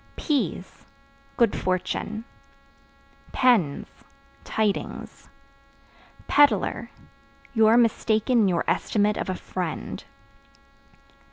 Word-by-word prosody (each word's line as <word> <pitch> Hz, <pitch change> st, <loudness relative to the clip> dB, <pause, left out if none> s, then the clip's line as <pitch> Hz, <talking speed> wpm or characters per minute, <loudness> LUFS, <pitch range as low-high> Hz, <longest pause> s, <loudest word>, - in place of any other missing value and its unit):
Peas 225 Hz, -, -2 dB, 0.5 s
Good 235 Hz, -4 st, +3 dB
fortune. 210 Hz, +4 st, -2 dB, 1.1 s
Pens 235 Hz, -, +2 dB, 0.6 s
Tidings. 215 Hz, -2 st, -3 dB, 1.0 s
Peddler 235 Hz, -3 st, +3 dB, 0.6 s
You 220 Hz, -3 st, +4 dB
are 225 Hz, +2 st, +5 dB
mistaken 230 Hz, +1 st, +2 dB
in 210 Hz, -, +4 dB
your 175 Hz, -3 st, +1 dB
estimate 210 Hz, 0 st, +1 dB
of -, -, -3 dB
a 185 Hz, -, -1 dB
friend. 180 Hz, -3 st, -5 dB
215 Hz, 80 wpm, -25 LUFS, 185-235 Hz, 1.1 s, are